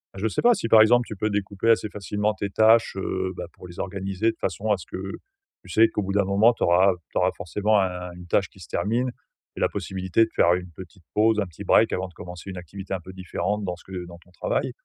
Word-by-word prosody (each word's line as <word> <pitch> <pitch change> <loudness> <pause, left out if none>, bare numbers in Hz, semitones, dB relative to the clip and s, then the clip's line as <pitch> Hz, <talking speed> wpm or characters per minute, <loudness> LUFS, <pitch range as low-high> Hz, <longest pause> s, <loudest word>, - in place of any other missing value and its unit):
Je 100 +3 -1
sais 110 - -1
pas, 240 0 +6
si 115 - -2
par 110 -1 +7
exemple 120 +2 +5
tu 110 - -7
peux 110 +2 -1
découper 100 +1 -1
assez 110 -2 +3
facilement 105 +1 -2
tes 100 0 -4
tâches, 110 +2 +4
heu, 95 -1 -2
bah, - - -5
pour 90 - -13
les 85 - -11
organiser 95 +3 -1
de - - -19
façon 100 +4 -2
à 105 - +3
ce 90 - -11
que - - -7 0.7
tu - - -15
sais, 110 +1 +5
qu'au 105 - -2
bout 95 0 -3
d'un 100 0 +3
moment, 100 +5 +4
tu - - -4
auras 90 +2 +5 0.2
tu - - -4
auras - - +3
forcément 105 +4 +1
un 90 -2 -2
une 90 0 -11
tâche 95 +2 +2
qui - - -20
se 90 - -11
termine 120 +7 0 0.4
et - - -7
la - - +3
possibilité 95 +3 0
de 110 - -1
faire 85 - +5
une 90 0 -3
petite 90 +1 -12
pause, 110 +1 +3
un 100 - +1
petit 85 - -10
break - - +4
avant 95 +1 -2
de 90 - -17
commencer 90 +3 -9
une 95 - -6
activité 95 +3 -7
un 95 - -1
peu 95 - -10
différente 95 +3 -3
dans 90 -1 -2
ce 90 - -18
que 90 -2 -7
dans 85 0 -11
ton 90 +1 -24
travail. - - -2
95 Hz, 265 wpm, -25 LUFS, 90-110 Hz, 0.7 s, par